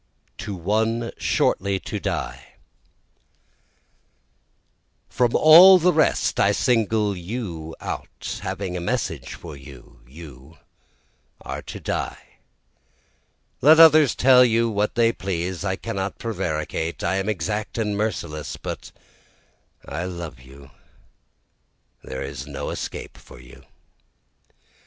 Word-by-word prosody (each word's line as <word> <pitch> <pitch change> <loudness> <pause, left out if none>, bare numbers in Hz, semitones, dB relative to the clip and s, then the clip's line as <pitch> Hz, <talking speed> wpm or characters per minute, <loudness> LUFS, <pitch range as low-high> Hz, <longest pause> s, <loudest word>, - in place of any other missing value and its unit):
To 100 -2 -5
One 110 +6 -1
Shortly 100 0 0
to - - -5
Die - - -5 2.5
From 120 -2 0
all 175 +5 +9
the 180 +1 +3
rest 155 0 +1
I - - +4
single 110 -3 +1
out 100 - -5
you, 85 -5 -6 0.7
having 95 -3 -4
a - - -2
message 85 - -3
for 80 -3 -10
you, 65 -3 -14
You 70 +1 -13 0.8
are - - -6
to - - -9
die - - -5 1.2
let 155 +4 +7
others 155 -4 +7
tell 125 -1 +6
you 115 -1 +2
what 105 +2 -1
they 115 -1 +3
please, 90 -1 -4
I 95 -1 -1
cannot 95 0 -4
prevaricate, 80 -6 -3
I 95 +3 0
am 95 +2 -2
exact 105 +3 -3
and 105 -2 -1
merciless, 85 -8 -3
but - - -7 1.0
I 80 +5 -4
love 85 -7 -7
you 65 +2 -15 1.3
there 65 +1 -6
is 70 0 -7
no 70 - -5
escape - - -6
for - - -15
you. - - -16
95 Hz, 115 wpm, -23 LUFS, 80-115 Hz, 2.5 s, all